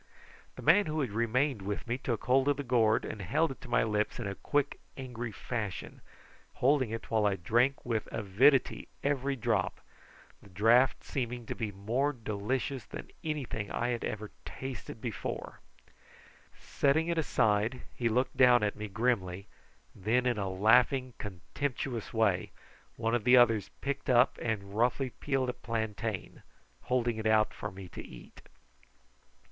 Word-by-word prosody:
The - - -9
man 205 -3 +5
who 155 0 -1
had 130 -6 -2
remained 115 +3 +1
with 100 +1 -4
me 120 +2 -1
took 120 -4 -2
hold 130 +2 +3
of 145 -2 +3
the 145 - -3
gourd 115 -4 +3
and 105 - -6
held 145 - +1
it 135 - -10
to 130 - -11
my - - +3
lips 105 -1 0
in 120 - -4
a 100 - -2
quick 145 +7 -1 0.2
angry 120 -3 -5
fashion, 105 -3 -5 0.5
holding 130 -2 +3
it 115 +1 -6
while 110 -2 +3
I 100 - +1
drank 120 +9 +1
with 115 -3 -1
avidity 115 +7 +3 0.2
every 140 -1 0
drop, 115 -7 0 0.6
the 100 - -16
draught 115 +7 +4
seeming 120 -2 -3
to - - -4
be 110 -3 -3
more 120 +9 0
delicious 120 +3 -3
than - - -9
anything 140 -10 -3
I 120 - -1
had 120 -1 -2
ever 110 0 -4
before - - -35
tasted. 130 -4 -7 1.6
Setting 150 +4 +1
it 170 -1 0
aside 110 -4 +1
he 120 -2 0
looked 125 +4 0
down 125 -3 +6
at 105 - 0
me 105 0 -5
grimly, 100 -4 -1 0.5
and - - -17
then 125 +3 +3
in 120 -4 +1
a 100 -1 -1
laughing 125 +6 +3
contemptuous 115 - -4
way 105 -6 +1 0.5
one 115 0 -1
of 120 -3 +1
the 125 +2 +7
others 115 -4 +4
picked 140 0 -3
up 125 0 +4
and 100 -3 -3
roughly 125 +3 +1
peeled 135 -1 -1
a - - -1
plantain, 110 -3 -4 0.4
holding 120 -2 +1
it 110 0 -1
out 110 0 +4
to 105 - -6
me 95 0 -9
to - - -8
eat. - - -13
120 Hz, 165 wpm, -31 LUFS, 105-130 Hz, 1.6 s, the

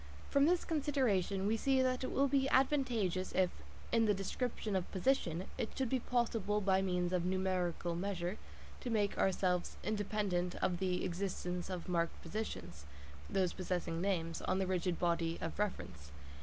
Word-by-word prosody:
From 280 +1 +5
this 350 +1 +2
consideration 255 - +1
we 215 +2 +2
see 265 +4 +2
that 255 0 +1
it - - -2
will 280 +1 +3
be 270 0 +2
advantageous 245 - +2
if, 185 -1 +3 0.4
in 230 -1 +4
the 210 -1 +3
description 210 +2 -2
of 185 -2 -1
position, 185 -5 +1
it 220 - -3
should 265 -3 0
be 260 - +2
possible 225 -4 0
by 190 -2 +3
means 180 -1 0
of 180 -2 +2
numerical 180 -2 0
measures 180 0 -2 0.4
to 250 - -4
make 210 -3 +1
ourselves 180 -2 +1
independent 205 -4 -1
of 175 -2 0
the 180 -1 0
existence 180 -1 -3
of 180 -2 -4
marked 170 -2 0
positions 85 - -5 0.5
(possessing 180 -3 -1
names) 165 -4 -1
on - - 0
the 190 - +1
rigid 180 -2 0
body 170 -1 +1
of 165 - -4
reference. 130 - -3
190 Hz, 155 wpm, -35 LUFS, 180-225 Hz, 0.5 s, From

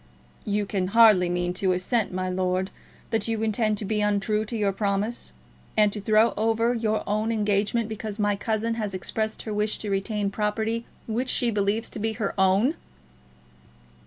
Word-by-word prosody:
"You 205 0 0
can 190 -2 -1
hardly 210 -6 +7
mean 175 0 -1
to 185 0 +1
assert, 200 +5 0
my 185 0 -2
lord, 185 +1 -1 0.4
that 225 -2 0
you 225 -1 -1
intend 215 -1 +1
to 205 - -3
be 210 +1 0
untrue 210 +1 +1
to 230 +2 -4
your 205 -2 +1
promise, 200 +3 -1 0.5
and 210 -1 +4
to 210 - -4
throw 215 +3 +4
over 225 +2 +1
your 220 -2 0
own 215 +2 0
engagement 210 +1 +1
because 215 -1 -5
my 205 -1 +1
cousin 220 +2 -1
has 205 -3 -3
expressed 220 +3 -3
her 215 - -4
wish 210 +1 0
to 210 - -4
retain 200 +1 -1
property 220 +3 -1 0.2
which 240 +3 -2
she 240 -3 +2
believes 205 +2 0
to - - -5
be 220 +1 -1
her 210 -2 -2
own!" 195 +8 +3
210 Hz, 175 wpm, -25 LUFS, 200-225 Hz, 0.5 s, hardly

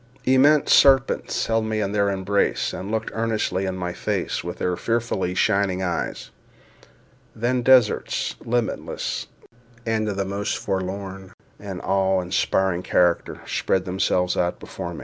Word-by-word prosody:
Immense 140 +3 +5
serpents 135 -1 +4
held 115 0 +1
me 110 0 -1
in 100 -2 -1
their 100 -1 +2
embrace, 100 +1 0
and 95 - -6
looked 110 0 -2
earnestly 110 -4 -1
in 95 - -2
my 90 -1 -3
face - - -2
with 85 +1 -5
their 90 - -1
fearfully 115 -5 -1
shining 95 -1 +1
eyes. 90 -2 -3 1.0
Then 125 +3 0
deserts, 125 -3 +3
limitless, 120 -1 -2 0.6
and 110 -1 0
of 100 - -4
the 100 - 0
most 100 +2 -2
forlorn 95 0 -4 0.3
and 100 -3 -6
awe 95 -1 +2
inspiring 90 0 0
character, 90 -1 +1
spread 95 -1 0
themselves 90 -1 0
out 90 0 -1
before 85 0 -7
me. - - -8
100 Hz, 140 wpm, -23 LUFS, 95-110 Hz, 1.0 s, Immense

